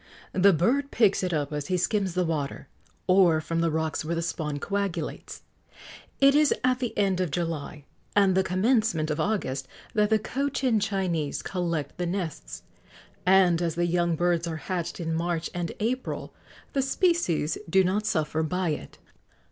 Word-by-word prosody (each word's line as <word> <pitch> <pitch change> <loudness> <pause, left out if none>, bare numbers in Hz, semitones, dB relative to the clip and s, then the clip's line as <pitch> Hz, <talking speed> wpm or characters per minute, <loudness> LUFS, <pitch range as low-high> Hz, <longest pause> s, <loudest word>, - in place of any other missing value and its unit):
The 195 +2 +5
bird 250 - +1
picks 210 -7 +3
it 185 -1 -1
up 150 -2 -1
as 145 -1 -3
he 185 - +1
skims 190 0 0
the 180 -1 +1
water, 145 -4 -3 0.4
or 185 -4 +5
from 165 +1 -2
the 165 - +2
rocks 160 0 -1
where 165 +2 -2
the 165 - -1
spawn 155 -3 -3
coagulates. 200 +3 -4 0.8
It 275 0 +6
is 300 0 +4
at 255 0 +2
the 245 -3 -3
end 195 -3 +2
of 180 - 0
July 155 -3 -4 0.3
and 200 -2 +5
the 190 - +3
commencement 185 -4 +1
of 150 - -2
August 155 -8 -1 0.3
that 210 -2 +2
the 220 - +4
Cochin 260 0 0
Chinese 185 -8 -1
collect 170 -5 -3
the 175 - -1
nests, 165 - -4 0.6
and, 185 -3 +5
as 170 -2 -1
the 175 +1 +1
young 170 -1 +1
birds 175 0 +1
are 165 - -3
hatched 170 +4 -4
in 165 -1 -2
March 170 0 -2
and 175 -2 -3
April, 250 +4 -3 0.4
the 275 - +2
species 270 - +1
do 190 +3 +5
not 205 +4 0
suffer 160 -5 0
by 180 +2 -1
it. 150 - -5
175 Hz, 170 wpm, -27 LUFS, 160-205 Hz, 0.8 s, It